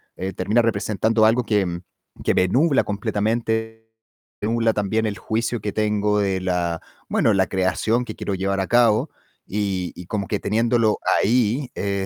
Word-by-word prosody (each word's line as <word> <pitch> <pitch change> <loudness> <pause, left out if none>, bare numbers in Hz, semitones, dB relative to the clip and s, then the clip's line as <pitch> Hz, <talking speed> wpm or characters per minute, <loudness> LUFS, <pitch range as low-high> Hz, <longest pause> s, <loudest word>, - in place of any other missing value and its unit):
eh, 95 +1 -4
termina 105 +6 +1
representando 110 0 +1
algo 120 +3 +3
que 95 -6 0 0.4
que - - +3
me 90 - +3
nubla 140 - +3
completamente, 110 +2 -2 0.5
me 105 - -1
nubla 115 -1 +2
también 110 +2 0
el 105 -1 -2
juicio 115 +1 -2
que 105 - -3
tengo 105 -1 +1
de 95 -2 0
la 85 -2 -1 0.3
bueno, 110 - +2
la 95 -1 +2
creación 100 +5 0
que 110 - -7
quiero 100 - -3
llevar 100 +1 -1
a 95 - -2
cabo 120 -3 +3 0.4
y 95 -3 -2
y 90 - -9
como 105 -3 -3
que 105 - -1
teniéndolo 115 0 +1 0.2
ahí, 120 +4 +1
eh, 100 -1 -2
105 Hz, 165 wpm, -22 LUFS, 95-115 Hz, 0.5 s, algo